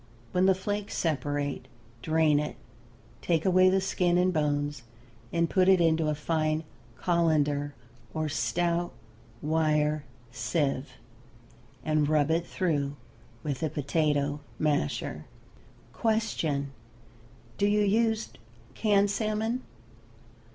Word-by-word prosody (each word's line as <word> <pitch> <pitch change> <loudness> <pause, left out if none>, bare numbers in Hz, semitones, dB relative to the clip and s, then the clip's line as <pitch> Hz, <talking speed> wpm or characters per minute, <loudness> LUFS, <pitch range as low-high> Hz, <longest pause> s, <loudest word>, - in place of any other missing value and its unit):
When 180 +1 +3
the 190 - +5
flakes 205 +2 -3
separate 145 -4 -1 0.3
drain 155 0 +3
it, 150 - -3 0.7
take 165 -2 +1
away 185 0 +5
the 190 +1 +3
skin 180 -2 +1
and 180 +1 +3
bones 145 -2 0 0.5
and 170 0 +2
put 185 +2 +3
it 190 -1 +6
into 165 -2 +3
a 150 - 0
fine 155 +1 0 0.3
colander 150 -4 +1 0.4
or 155 -1 -2
stout 170 +8 0 0.5
wire 150 -1 +1 0.3
sieve, 135 -1 -1 0.9
and 155 -1 +2
rub 155 0 +3
it 170 +1 +1
through 145 -6 -1 0.5
with 140 -3 -3
a 160 - 0
potato 145 -1 0 0.2
masher. 150 0 -1 0.7
Question. 165 - 0 0.9
Do 200 - +3
you 210 0 +3
use 220 +2 +2 0.4
canned 205 -2 +3
salmon? 220 +3 -1
160 Hz, 110 wpm, -28 LUFS, 145-185 Hz, 0.9 s, it